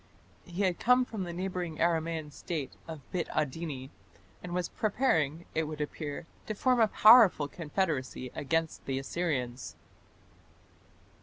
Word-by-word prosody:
He 180 +2 -3
had 180 -3 +1
come 250 +1 +4
from 215 -6 -4
the 175 - -5
neighbouring 180 -2 -3
Aramaean 165 -2 0
State 155 -5 -4 0.2
of 160 -3 -7
Bit 175 -3 -1
Adini, 150 -2 -2 0.5
and 180 - -7
was 180 0 -1
preparing, 170 - 0
it 160 0 0
would 155 0 -6
appear, 150 +1 -4 0.2
to 215 - -3
form 250 +3 +2
a 225 - +6
powerful 215 -9 +7
confederacy 145 -6 -2
against 160 +2 -2
the 135 -1 -1
Assyrians. 135 -4 -3
165 Hz, 135 wpm, -30 LUFS, 150-185 Hz, 0.5 s, powerful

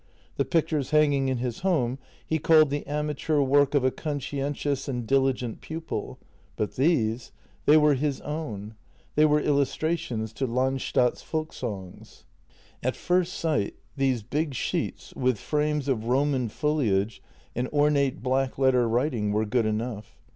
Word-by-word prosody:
The - - +1
pictures 155 -5 0
hanging 145 -3 +3
in 130 -1 0
his 120 -1 -3
home 135 -9 0 0.3
he 160 - 0
called 155 -1 +5
the 145 0 -3
amateur 150 +1 -1
work 140 +1 +3
of 140 - +3
a 130 - +3
conscientious 145 -1 -3
and 125 -4 -3
diligent 130 -2 +1
pupil, 160 -9 -5 0.4
but 105 - -3
these 125 -6 +1 0.2
— - - -33
they 150 - +8
were 150 -1 +5
his 140 0 -1
own. 115 -9 -5 0.4
They 150 - +5
were 150 0 +4
illustrations 140 -5 -1
to 130 +3 -2
Land 130 +2 0
stad's 125 -1 +1
Folksongs. 120 - -6 0.6
At 130 +1 -1
first 180 0 +1
sight 150 -11 -1 0.2
these 135 -5 +1
big 145 +4 -2
sheets - - -3
with 125 -3 +1
frames 150 +7 -1
of 120 -5 0
Roman 130 -1 +1
foliage 110 -8 0 0.3
and 125 +2 -1
ornate 145 -3 +1
black 130 0 0
letter 130 -3 +3
writing 120 -3 0
were 105 +1 +1
good 115 +1 +1
enough. 110 - -4
135 Hz, 145 wpm, -26 LUFS, 120-150 Hz, 0.6 s, they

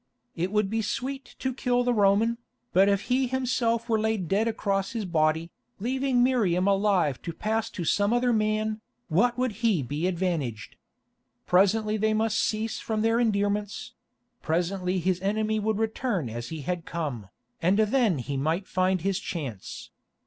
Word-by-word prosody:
It 180 +3 -2
would 210 -1 +2
be 225 +3 -1
sweet 265 +6 -4
to 260 -1 -2
kill 245 -1 +1
the 245 0 +2
Roman, 215 +2 +3 0.3
but 195 +2 +5
if 200 -1 +2
he 255 +3 +1
himself 240 -2 0
were 225 -2 +2
laid 215 -5 0
dead 205 +6 +1
across 195 -3 -1
his 225 -3 -2
body, 160 -1 +1 0.3
leaving 255 +2 +1
Miriam 200 -8 +2
alive 195 -8 +2
to 170 - -4
pass 220 +6 -2
to 175 - -5
some 205 +5 +2
other 245 0 +2
man, 215 0 0 0.3
what 235 +9 +2
would 255 -1 +1
he 205 -11 +3
be 145 +8 -2
advantaged? 165 - -2 0.7
Presently 210 +4 +3
they 215 +1 +1
must 220 0 +1
cease 220 +1 -1
from 220 -1 -2
their 225 +1 +3
endearments; 205 -2 -1 0.5
presently 180 +3 -1
his 185 0 0
enemy 215 +2 0
would 215 0 0
return 220 - -1
as 120 +1 -5
he 160 -2 -5
had 175 +4 -3
come, 140 - -4 0.3
and 180 +4 +3
then 220 - +3
he 140 +2 -3
might 160 +7 -1
find 185 -1 +1
his 195 +1 0
chance. 140 - -6
205 Hz, 165 wpm, -27 LUFS, 180-225 Hz, 0.7 s, but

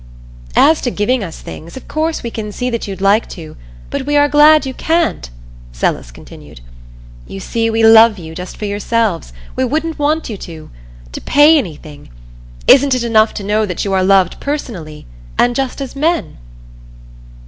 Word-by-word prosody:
"As 315 +1 +4
to 245 - -1
giving 235 +2 -1
us 165 -4 -8
things 165 +9 -10
of 260 - -11
course 315 +1 -2
we 235 - -5
can 210 -2 -6
see 250 +4 -3
that 235 -2 -3
you'd 190 -1 -7
like 200 +3 +2
to, 160 -4 -10 0.4
but 265 - -4
we 290 0 +2
are 290 0 +4
glad 300 +1 +5
you 265 - -4
can't," 325 - -1 0.4
Celis - - -2
continued. - - -14 0.7
"You 95 - -8
see, 225 - -2
we 225 0 0
love 225 -1 +7
you 160 -3 -9
just 180 +2 -8
for 210 - -5
yourselves 205 - -1 0.2
we - - 0
wouldn't 310 +5 -2
want 305 +2 0
you 215 - -6
to 165 -4 -11 0.4
to - - -7
pay 295 +3 +5
anything. 155 - -5 0.6
Isn't 275 0 +5
it 250 - -2
enough 220 -2 +2
to 205 - -5
know 210 +2 0
that 180 +1 -4
you 195 - -2
are 190 -1 +2
loved 190 -2 +2
personally 195 - -6 0.3
and 240 0 +2
just 270 0 -2
as 270 -1 -6
men?" 320 - -1
225 Hz, 180 wpm, -15 LUFS, 190-285 Hz, 0.7 s, love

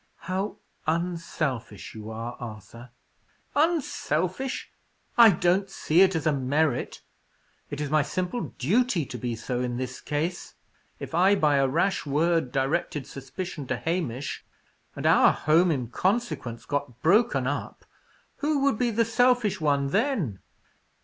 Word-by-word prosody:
"How 190 +3 -3 0.3
unselfish 160 - -2
you 110 0 -8
are, 115 +2 -5
Arthur!" 115 +1 -9 0.7
"Unselfish! 265 - 0 0.4
I 235 -2 +9
don't 185 +1 +2
see 170 -2 +2
it 190 -1 +5
as 160 -1 -2
a 155 - +3
merit. 140 +1 0 0.7
It 145 - -5
is 150 -1 -3
my 155 0 +4
simple 180 - -2
duty 195 - +2
to 125 - -7
be 120 0 -2
so 120 +2 -3
in 125 -1 -2
this 125 0 -5
case. 160 +4 -3 0.4
If - - -8
I, 185 +4 +5
by 150 -6 +3
a 135 -1 +3
rash 170 +8 +1
word, 160 -1 +1
directed 140 +1 -1
suspicion 145 +2 -7
to 130 - -1
Hamish, 145 -2 -3 0.5
and - - -5
our - - +6
home 165 +4 +3
in 130 -7 -1
consequence 155 - -2
got 145 -4 -4
broken 175 - +3
up, 145 +2 -4 0.5
who 300 0 0
would 280 -6 +2
be 245 -1 +2
the 230 +1 +2
selfish 245 -4 +2
one 140 -2 +1
then?" 200 - 0
155 Hz, 140 wpm, -26 LUFS, 130-190 Hz, 0.7 s, I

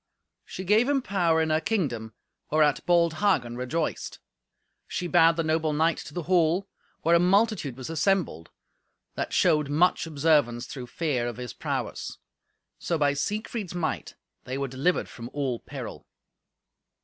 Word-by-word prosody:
She 185 - -7
gave 215 +7 +3
him 275 -3 +1
power 170 -6 +2
in 160 - -1
her 155 +1 +2
kingdom, 130 - -2 0.3
whereat 150 -1 +3
bold 170 -2 +4
Hagen 125 -12 +1
rejoiced. 140 +6 -3 0.7
She 180 - -3
bade 170 -1 +5
the 165 - 0
noble 155 -1 +1
knight 160 +2 +2
to - - -9
the 175 - -2
hall, 180 +2 +2 0.4
where 165 - +3
a 170 - +6
multitude 190 - +2
was 130 - -6
assembled, 165 - 0 0.6
that - - -3
showed 150 -2 +3
much 165 +3 +2
observance 145 -6 +2
through 125 -3 -7
fear 130 -4 -1
of 120 - -5
his 125 -1 -6
prowess. - - -4 0.6
So, 170 - -1
by 145 -2 +2
Siegfried's 205 +4 -3
might, 170 -3 -3 0.3
they 130 +1 -4
were 140 0 -2
delivered 135 +8 0
from 115 0 -9
all 135 -5 -1
peril. - - -8
160 Hz, 150 wpm, -27 LUFS, 140-180 Hz, 0.7 s, a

